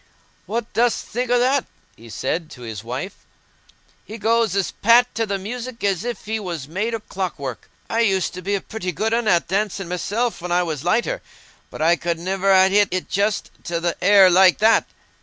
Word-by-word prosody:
"What 230 +1 -4
dost 235 +1 +1
think 245 +2 -3
o' 245 - +4
that?" 260 +2 +2 0.3
he 115 +1 -14
said 155 +8 -3
to 125 - -12
his 110 -3 -7
wife. 130 - -6 0.8
"He 220 - -9
goes 230 -2 +1
as 195 -2 0
pat 240 +3 +4
to 225 0 -1
the 200 -1 -1
music 235 +4 -7
as 195 -4 0
if 240 -3 -5
he 220 +1 -2
was 170 -9 -5
made 210 +8 -2
o' - - -4
clockwork. 165 - -5 0.2
I 225 - -1
used 195 -5 +1
to 185 - -7
be 200 +3 -1
a 195 - -2
pretty 200 -5 -5
good 220 +1 -1
un 235 -1 0
at 175 -5 +3
dancing 195 0 -1
myself 210 +7 -2
when 180 0 -5
I 180 +1 +3
was 155 -5 -4
lighter, 235 - 0 0.5
but - - -5
I 170 +1 +4
could 170 0 -2
niver 190 +3 0
ha' 190 0 +6
hit 205 0 +4
it 185 0 -3
just 200 +1 0
to 170 -1 -2
th' 170 0 -1
hair 195 -1 +6
like 185 0 +6
that." 220 +1 +4
195 Hz, 205 wpm, -21 LUFS, 175-225 Hz, 0.8 s, ha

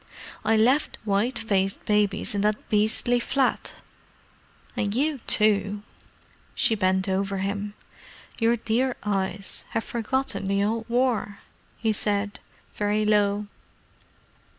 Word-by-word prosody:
I 220 +1 +3
left 255 +7 +3
white 215 +5 +1
faced 195 -3 0
babies 210 -1 +2
in 200 - 0
that 210 +1 0
beastly 220 +3 +2
flat. 260 +2 0 1.0
And 205 0 -1
you 290 +2 +1
too——" 205 -1 +2 0.7
She - - +2
bent 190 -2 +1
over 195 +1 0
him. 200 +2 -3 0.6
"Your 230 0 +4
dear 240 +3 0
eyes 195 -1 -2
have 225 - 0
forgotten 235 -4 -2
the 200 0 +2
old 225 +2 -1
War!" 235 -4 0 0.4
he 220 -1 +1
said, 205 -1 0 0.3
very 210 +1 0
low. 205 -1 +2
210 Hz, 115 wpm, -25 LUFS, 200-230 Hz, 1.0 s, Your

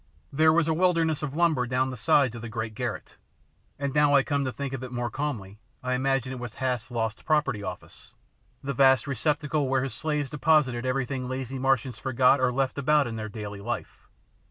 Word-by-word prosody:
There 155 +3 +5
was 165 0 +2
a 160 - +2
wilderness 165 -3 +2
of 145 -2 -4
lumber 160 -7 +2
down 130 +1 0
the - - -5
sides 125 +2 +3
of 115 - -7
the 115 - -6
great 110 -1 -4
garret, 120 0 -5 0.6
and 140 -1 -3
now 145 -1 +4
I 140 - +5
come 140 -2 0
to 130 - -1
think 140 +1 -5
of 130 -1 -4
it 125 - -7
more 120 -1 -3
calmly 110 -9 -4 0.2
I 130 0 -1
imagine 130 0 0
it 130 - -6
was 120 -3 -7
Hath's 125 -3 -2
Lost 115 -2 -3
Property 140 -8 +1
Office, 100 - -9 0.5
the 140 +1 -2
vast 135 -2 +5
receptacle 145 +1 0
where 135 0 +2
his 135 -4 -4
slaves 150 +1 -2
deposited 140 -4 +2
everything 130 0 -2
lazy 130 0 -4
Martians 130 -2 0
forgot 130 0 +3
or 130 -1 +3
left 135 +2 -1
about 150 +1 +3
in 115 -2 -5
their 110 -1 -5
daily 105 -1 -7
life. 120 +2 -6
130 Hz, 205 wpm, -27 LUFS, 120-145 Hz, 0.6 s, There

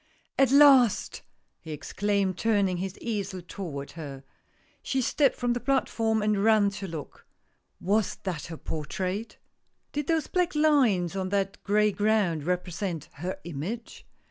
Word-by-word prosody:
" - - -16
At 270 -2 +5
last! 270 -6 +5 0.2
" - - -48
he 160 - -11
exclaimed, 195 +5 -1
turning 200 -3 +1
his 190 +1 -4
easel 200 -4 -3
toward 145 -9 -6
her. 140 -5 -8 0.6
She 265 - -1
stepped 270 +2 +2
from 245 -1 0
the 240 - -2
platform, 225 -5 +1
and 210 -2 +1
ran 215 -2 +4
to 195 0 -6
look. 160 -4 -8 0.5
Was 205 +1 +1
that 180 -5 -4
her 165 -1 -7
portrait! 185 +9 -4 0.5
Did 295 -1 -3
those 320 -3 +1
black 360 -2 0
lines 255 - +3
on 190 -1 -2
that 195 0 -1
gray 210 +1 +3
ground 205 -7 +1
represent 180 -2 -3
her 180 +5 -4
image 175 +9 -6
200 Hz, 145 wpm, -27 LUFS, 180-225 Hz, 0.6 s, At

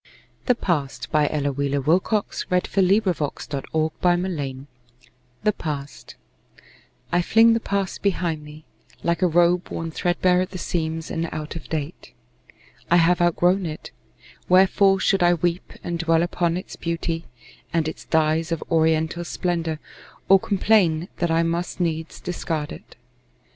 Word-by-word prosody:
or 250 - +6
him 160 - 0 0.2
alway. 150 -1 +4
Ella 145 -2 -1
Wheeler 140 +1 -1
Wilcox 185 - 0
The 180 0 +3 3.0
Past 145 -3 -6 1.0
I 175 +1 +3
FLING 225 +5 +5
the 230 - +1
past 200 -3 -2
behind 175 -6 -1
me, 150 +1 -12 0.4
like 170 +2 0
a 180 - +4
robe 175 +1 +2
Worn 165 0 -4
threadbare 180 +2 +2
at 185 - -2
the 185 - -7
seams, 160 -2 -3
and 165 0 -2
out 155 +1 -5
of 165 - -8
date. 155 0 -5 0.8
I 170 - +5
have 175 +1 +3
outgrown 175 +2 +2
it. 155 -1 -7 0.6
Wherefore 195 +1 +5
should 195 0 +2
I 175 0 +5
weep 175 +2 -2
And 170 -1 -3
dwell 165 0 +2
upon 175 0 0
its 185 - -7
beauty, 165 0 -3 0.5
and 165 -2 +1
its 160 - -6
dyes 160 +1 +1
Of 165 - -2
oriental 160 +1 +2
splendor, 170 -2 -2 0.5
or 195 0 +7
complain 185 -5 +2
That 175 - 0
I 165 +1 +2
must 170 +2 -2
needs 160 -2 -2
discard 160 -4 -3
it? - - -11
170 Hz, 135 wpm, -23 LUFS, 160-180 Hz, 3.0 s, or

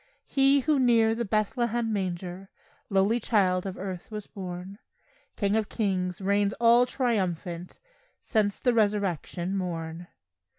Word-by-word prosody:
He 275 0 +3
who 295 +1 +2
near 230 -3 +4
the 235 +1 -2
Bethlehem 225 +2 0
manger 185 -1 -4 0.4
Lowly 200 +4 +2
child 195 -5 +1
of 190 - -6
earth 185 -2 -6
was 210 -2 -6
born, 185 0 -8 0.6
King 200 0 +1
of 220 -2 0
kings 185 -5 -1
reigns 200 +1 +1
all 235 +1 +5
triumphant 185 - -2 0.4
Since 210 -3 0
the 245 - +2
resurrection 200 -4 0
morn. 170 -2 -4
200 Hz, 125 wpm, -27 LUFS, 185-225 Hz, 0.6 s, all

